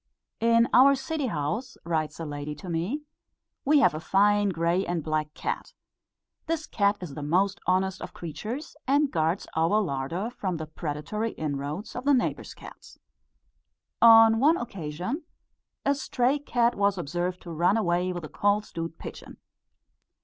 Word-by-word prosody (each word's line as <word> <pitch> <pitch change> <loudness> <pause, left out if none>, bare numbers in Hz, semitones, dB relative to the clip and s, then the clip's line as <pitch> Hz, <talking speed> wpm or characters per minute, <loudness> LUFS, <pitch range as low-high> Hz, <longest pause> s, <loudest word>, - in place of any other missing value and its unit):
"In 230 0 +4
our 275 +2 +7
city 270 +1 -3
house," 165 - -3
writes 160 -2 -2
a 165 - -4
lady 145 0 -5
to 175 +5 -9
me, 190 - -2 0.6
"we 290 +1 +4
have - - +5
a 155 - -4
fine 205 +4 +3
grey 170 +1 +1
and 175 -3 -2
black 155 -1 -1
cat. - - -4 0.7
This 320 -1 -1
cat 200 -1 +1
is 170 -6 -6
the 150 - -6
most 185 +7 +1
honest 190 +1 +1
of - - -6
creatures, 220 - -6
and 285 +1 +3
guards 165 +4 0
our 165 +7 +3
larder 170 - -2
from 185 -7 -3
the 160 - -5
predatory 155 +8 -4
inroads 150 +6 -4
of 245 - -5
the 285 -1 +5
neighbour's 250 - -2
cats. - - -13 1.0
On 225 -1 +8
one 310 +6 +5
occasion 185 - -4 0.6
a 280 - +4
stray 265 0 0
cat 240 -4 +1
was 200 -1 +1
observed 175 +3 -2
to 170 - -8
run 175 +6 +2
away 180 -3 +1
with 175 -2 -5
a - - -5
cold 205 +7 +1
stewed 165 -3 -6
pigeon. - - -9
190 Hz, 155 wpm, -27 LUFS, 160-235 Hz, 1.0 s, On